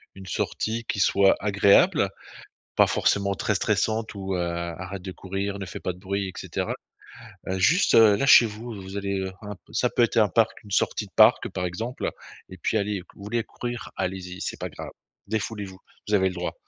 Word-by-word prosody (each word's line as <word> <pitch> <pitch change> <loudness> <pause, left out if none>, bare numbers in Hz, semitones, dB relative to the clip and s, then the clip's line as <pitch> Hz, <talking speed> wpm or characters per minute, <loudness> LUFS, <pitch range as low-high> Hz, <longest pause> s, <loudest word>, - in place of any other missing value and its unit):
une 95 -1 -11
sortie 115 +5 -2
qui 100 - -3
soit 100 0 +4
agréable, 100 - +4 0.7
pas - - +5
forcément 100 0 +1
très 80 - 0
stressante 110 0 0
ou: 95 -1 -4
«Heu, - - -1
arrête 85 +2 -4
de 95 - -5
courir, 100 +2 -4
ne 95 - -4
fait - - -7
pas 90 - -2
de 90 - -16
bruit 100 +1 -2
et 95 - -7
cetera» - - -3 0.7
heu, 95 0 -1
juste 165 - +4
là, 110 +2 +6
chez 130 -3 +8
vous, 110 +3 -8
vous 95 +1 -7
allez, 100 -1 -2
heu, 95 0 -3
un 105 0 -6
p - - -26
ça 125 - +1
peut - - +1
être 115 - 0
un 105 -2 +5
parc, 115 +3 +1
une 105 - -14
sortie 105 - +1
de - - -24
parc - - +6
par 90 - -3
exemple, 115 +8 -3 0.4
et 95 - -10
puis: 90 - 0
«Allez, 100 -2 -1
vous 100 - -12
voulez 115 +3 -1
courir, 120 +1 -6
allez-y, 90 0 -4
c'est - - -4
pas - - -4
grave, - - -8 0.4
défoulez 110 0 -3
vous, 95 -1 -12 0.3
vous 105 - -2
avez 95 -1 +3
le - - -7
droit». 90 0 -3
100 Hz, 210 wpm, -25 LUFS, 95-110 Hz, 0.7 s, chez